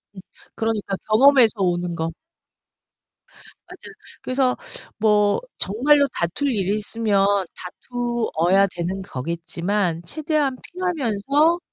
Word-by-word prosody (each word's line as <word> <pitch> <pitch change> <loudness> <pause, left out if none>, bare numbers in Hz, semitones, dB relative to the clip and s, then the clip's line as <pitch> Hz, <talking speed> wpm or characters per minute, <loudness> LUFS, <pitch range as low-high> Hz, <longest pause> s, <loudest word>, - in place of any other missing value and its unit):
음 - - -9 0.4
그러니까 220 -3 -2
경험에서 255 0 +6
오는 175 -1 0
거. 165 0 -3 1.5
맞아요. - - -12 0.3
그래서 255 -1 0 0.4
뭐 210 -2 +3 0.2
정말로 280 +7 +3
다툴 215 - -1
일이 195 +1 0
있으면 210 -2 +1 0.3
다투어야 200 -3 0
되는 180 +3 -3
거겠지만 170 +4 -2
최대한 295 - -1
피하면서 310 - 0
210 Hz, 235 characters per minute, -22 LUFS, 180-265 Hz, 1.5 s, 경험에서